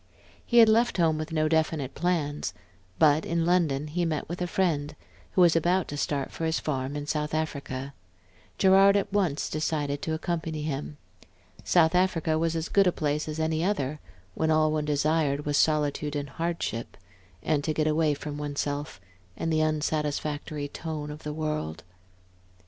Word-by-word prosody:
He 240 Hz, -, 0 dB
had 230 Hz, -1 st, +9 dB
left 230 Hz, +1 st, +3 dB
home 160 Hz, -3 st, +2 dB
with 155 Hz, +1 st, -5 dB
no 155 Hz, -1 st, +1 dB
definite 155 Hz, -4 st, 0 dB
plans; 155 Hz, -3 st, -1 dB, 0.4 s
but 155 Hz, 0 st, +4 dB
in 170 Hz, -1 st, 0 dB
London 165 Hz, -5 st, +2 dB
he 165 Hz, +4 st, -2 dB
met 160 Hz, -3 st, -1 dB
a 175 Hz, +1 st, -3 dB
friend, 155 Hz, -5 st, 0 dB, 0.4 s
who 185 Hz, -, +3 dB
was 170 Hz, -2 st, +6 dB
about 175 Hz, +3 st, +2 dB
to 145 Hz, -, -4 dB
start 145 Hz, -1 st, -2 dB
for -, -, -6 dB
his 160 Hz, 0 st, 0 dB
farm 135 Hz, -1 st, -3 dB
in 145 Hz, 0 st, -4 dB
South 150 Hz, 0 st, -2 dB
Africa. 140 Hz, -3 st, -3 dB, 0.6 s
Gerard 195 Hz, +1 st, +6 dB
at 200 Hz, 0 st, -2 dB
once 180 Hz, -8 st, +1 dB
decided 145 Hz, -2 st, -2 dB
to 160 Hz, -, -1 dB
accompany 160 Hz, -2 st, -3 dB
him. 150 Hz, 0 st, -4 dB, 0.7 s
South 165 Hz, -2 st, +4 dB
Africa 165 Hz, -3 st, +2 dB
was 165 Hz, 0 st, 0 dB
as 160 Hz, 0 st, -2 dB
good 200 Hz, -1 st, +4 dB
a -, -, +4 dB
place 150 Hz, -1 st, -1 dB
as 155 Hz, +1 st, -4 dB
any 160 Hz, 0 st, 0 dB
other, 155 Hz, -7 st, -1 dB, 0.3 s
when 160 Hz, +8 st, 0 dB
all 155 Hz, 0 st, +3 dB
one 155 Hz, -1 st, -1 dB
desired 150 Hz, -1 st, +1 dB
was 145 Hz, 0 st, 0 dB
solitude 150 Hz, -1 st, +1 dB
and 145 Hz, -1 st, -3 dB
hardship, 165 Hz, -8 st, -3 dB, 0.5 s
and 150 Hz, -2 st, +1 dB
to 155 Hz, -, 0 dB
get 155 Hz, 0 st, 0 dB
away 155 Hz, -1 st, +2 dB
from 145 Hz, 0 st, -6 dB
one's 145 Hz, -1 st, -2 dB
self, 145 Hz, -5 st, -4 dB, 0.4 s
and 165 Hz, -, -1 dB
the 155 Hz, -, +2 dB
unsatisfactory 150 Hz, -1 st, -1 dB
tone 150 Hz, 0 st, -5 dB
of 150 Hz, +1 st, -9 dB
the 150 Hz, -, -5 dB
world. 150 Hz, -, -3 dB
155 Hz, 170 wpm, -27 LUFS, 145-165 Hz, 0.7 s, had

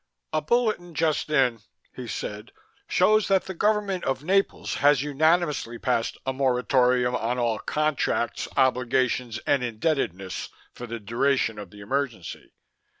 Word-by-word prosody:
"A 155 Hz, -, +1 dB
bulletin 215 Hz, -4 st, 0 dB
just 155 Hz, -1 st, 0 dB
in," 130 Hz, -6 st, +2 dB, 0.4 s
he 125 Hz, -2 st, -7 dB
said, 105 Hz, -1 st, -6 dB, 0.4 s
"shows 215 Hz, 0 st, +3 dB
that 195 Hz, -1 st, +3 dB
the 190 Hz, -, -5 dB
government 205 Hz, -1 st, 0 dB
of 135 Hz, +1 st, -2 dB
Naples 195 Hz, +4 st, 0 dB
has 140 Hz, -1 st, +4 dB
unanimously 150 Hz, -4 st, +1 dB
passed 115 Hz, -1 st, -1 dB
a 130 Hz, -, -1 dB
moritorium 125 Hz, -1 st, +2 dB
on 120 Hz, +1 st, -1 dB
all 120 Hz, -3 st, 0 dB
contracts, 150 Hz, -5 st, -1 dB
obligations 125 Hz, -2 st, +1 dB
and 135 Hz, -3 st, +2 dB
indebtedness 110 Hz, -, -2 dB, 0.2 s
for 120 Hz, -, -8 dB
the 115 Hz, 0 st, -5 dB
duration 115 Hz, +1 st, 0 dB
of 100 Hz, -3 st, -8 dB
the 105 Hz, +2 st, -13 dB
emergency. 115 Hz, -5 st, -4 dB
130 Hz, 135 wpm, -25 LUFS, 120-155 Hz, 0.4 s, has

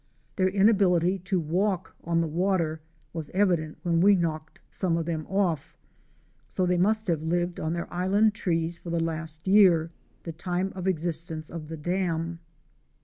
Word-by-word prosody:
Their 185 Hz, -2 st, +2 dB
inability 195 Hz, -3 st, +3 dB
to 185 Hz, +1 st, -1 dB
walk 185 Hz, +4 st, -1 dB
on 165 Hz, 0 st, +1 dB
the 165 Hz, -, -1 dB
water 165 Hz, -1 st, 0 dB, 0.3 s
was 160 Hz, -3 st, -5 dB
evident 175 Hz, -6 st, +1 dB
when 170 Hz, -2 st, +2 dB
we 200 Hz, +2 st, +6 dB
knocked 155 Hz, -3 st, -3 dB
some 175 Hz, -3 st, 0 dB
of 165 Hz, -, -2 dB
them 160 Hz, -2 st, -3 dB
off, 180 Hz, -7 st, -1 dB, 0.7 s
so 185 Hz, -, -1 dB
they 180 Hz, 0 st, +1 dB
must 215 Hz, +4 st, +2 dB
have 165 Hz, -5 st, 0 dB
lived 175 Hz, +2 st, -1 dB
on 160 Hz, +1 st, -2 dB
their 170 Hz, +1 st, -5 dB
island 200 Hz, +4 st, +2 dB
trees 170 Hz, -5 st, -1 dB
for 175 Hz, -, -9 dB
the 170 Hz, 0 st, 0 dB
last 160 Hz, 0 st, -3 dB
year, 180 Hz, -5 st, +5 dB, 0.3 s
the 165 Hz, -, -5 dB
time 180 Hz, +3 st, -2 dB
of 185 Hz, 0 st, -4 dB
existence 165 Hz, -2 st, 0 dB
of 165 Hz, -2 st, -7 dB
the 160 Hz, +1 st, -6 dB
dam. 170 Hz, 0 st, -2 dB
175 Hz, 165 wpm, -27 LUFS, 165-190 Hz, 0.7 s, we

